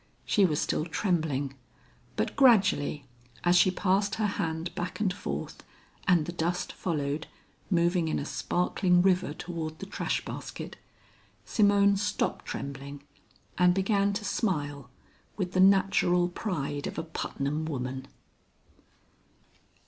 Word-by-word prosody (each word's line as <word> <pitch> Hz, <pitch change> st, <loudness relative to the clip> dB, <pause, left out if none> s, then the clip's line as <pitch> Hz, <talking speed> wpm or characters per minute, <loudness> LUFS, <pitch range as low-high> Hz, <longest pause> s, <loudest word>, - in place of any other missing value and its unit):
She 200 Hz, -, +4 dB
was 150 Hz, -5 st, +1 dB
still -, -, 0 dB
trembling, 160 Hz, -6 st, -1 dB, 0.6 s
but -, -, -1 dB
gradually, 200 Hz, -, +4 dB, 0.4 s
as 175 Hz, 0 st, +4 dB
she 180 Hz, +1 st, +6 dB
passed 195 Hz, +2 st, +1 dB
her 220 Hz, -, 0 dB
hand 165 Hz, -4 st, -2 dB
back 175 Hz, +1 st, -4 dB
and 200 Hz, -4 st, +1 dB
forth, -, -, -5 dB, 0.4 s
and 175 Hz, -5 st, +4 dB
the 175 Hz, -, -4 dB
dust 175 Hz, +1 st, -2 dB
followed, 150 Hz, -3 st, -2 dB, 0.4 s
moving 175 Hz, -2 st, +2 dB
in 155 Hz, -, 0 dB
a 145 Hz, -, -3 dB
sparkling 180 Hz, +5 st, +1 dB
river 185 Hz, -4 st, +2 dB
toward 160 Hz, -2 st, -5 dB
the 195 Hz, -, -7 dB
trash 195 Hz, -, -2 dB
basket, -, -, -7 dB, 0.7 s
Simone 200 Hz, -1 st, +4 dB
stopped 205 Hz, +1 st, -1 dB
trembling 140 Hz, +1 st, -6 dB, 0.6 s
and 180 Hz, 0 st, +5 dB
began 200 Hz, +1 st, +2 dB
to 210 Hz, +1 st, -3 dB
smile 145 Hz, -, -2 dB, 0.5 s
with 185 Hz, -3 st, -2 dB
the 185 Hz, -, 0 dB
natural 185 Hz, -2 st, +4 dB
pride 150 Hz, -7 st, -3 dB
of -, -, -6 dB
a -, -, -2 dB
Putnam 155 Hz, -1 st, -3 dB
woman. 130 Hz, -3 st, -4 dB
175 Hz, 125 wpm, -29 LUFS, 150-195 Hz, 0.7 s, she